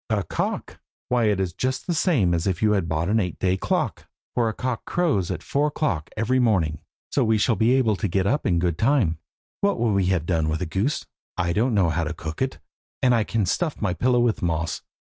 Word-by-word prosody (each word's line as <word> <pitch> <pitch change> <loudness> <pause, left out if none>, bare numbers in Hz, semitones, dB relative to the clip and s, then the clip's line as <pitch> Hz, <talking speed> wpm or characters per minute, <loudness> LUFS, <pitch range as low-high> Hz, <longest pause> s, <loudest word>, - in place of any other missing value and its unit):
A 105 -3 +1
cock! - - -3 0.3
why 125 -2 +2
it 105 -2 +2
is 95 -3 -1
just 130 +6 -2
the 175 - -1
same 145 - +2
as 85 +2 0
if 95 +1 -1
you 105 - +4
had 95 -6 0
bought 80 +1 0
an 110 +3 +2
eight 90 -4 -2
day 95 0 +1
clock, 95 - -2 0.3
for 120 -2 +1
the 110 - -1
cock 125 +1 -3
crows 150 - 0
at 85 -4 -4
four 145 +2 +1
o'clock 145 - -2
every 120 +4 +1
morning, 90 - +1 0.3
so 140 - +2
we 110 -1 +3
shall 110 +2 +2
be 115 +4 +3
able 115 -5 +2
to 105 - -1
get 95 +1 0
up 140 +9 +1
in 90 -4 +2
good 85 -1 0
time. 110 - +2 0.4
What 200 0 +1
could 115 -1 +1
we 100 -2 +2
have 90 -4 +1
done 80 -3 0
with 80 - -1
a 90 - -2
goose? 95 - -1 0.3
I 85 -2 0
don't 115 +4 +1
know 95 -4 +3
how 80 +1 0
to 80 +2 -4
cook 80 +4 -6
it, 130 0 -1 0.5
and 125 -1 +5
I 115 -2 +3
can 110 -1 0
stuff 155 - -1
my 100 -5 0
pillow 125 +7 +2
with 120 -2 +1
moss. 85 -1 -1
105 Hz, 240 wpm, -24 LUFS, 85-125 Hz, 0.5 s, and